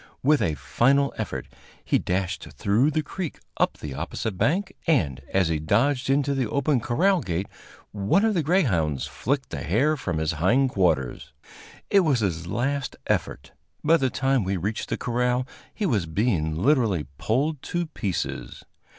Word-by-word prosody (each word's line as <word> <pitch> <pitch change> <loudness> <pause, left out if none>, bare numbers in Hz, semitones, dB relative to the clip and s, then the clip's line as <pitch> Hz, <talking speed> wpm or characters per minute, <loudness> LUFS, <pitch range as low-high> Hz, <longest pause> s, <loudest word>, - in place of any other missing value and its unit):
With 150 +2 +4
a 80 - +1
final 140 - +2
effort - - -4 0.4
he - - +2
dashed 95 0 -2
through 110 +9 +2
the 155 0 0
creek 175 0 -5 0.2
up - - +1
the 75 -3 -6
opposite 100 +9 -4
bank, 190 - 0
and, 75 - +2
as 95 -3 +2
he 80 -2 0
dodged 125 - +1
into 140 +1 +2
the 130 -5 -1
open 140 -1 +1
corral 170 - +2
gate, 90 -2 -2 0.5
one 105 - +2
of 220 - +2
the 175 - +1
greyhounds 100 - +1
flicked 135 +3 -2
the 70 - -4
hair 130 - +2
from 95 - -3
his 80 +1 0
hind 115 - +2
quarters. 80 - 0 0.6
It 200 - +6
was 145 -10 +2
his 85 -4 -1
last 130 +7 -1
effort. - - -2 0.3
By 165 +2 +5
the 135 -4 +1
time 135 -1 +1
we 95 +1 -1
reached 105 +5 -3
the - - -1
corral, 125 +1 0 0.3
he 215 - -3
was 105 - +1
being 80 -4 0
literally 110 - +2
pulled 140 +5 0
to 175 0 -2
pieces. 95 - -4
120 Hz, 165 wpm, -25 LUFS, 90-145 Hz, 0.6 s, It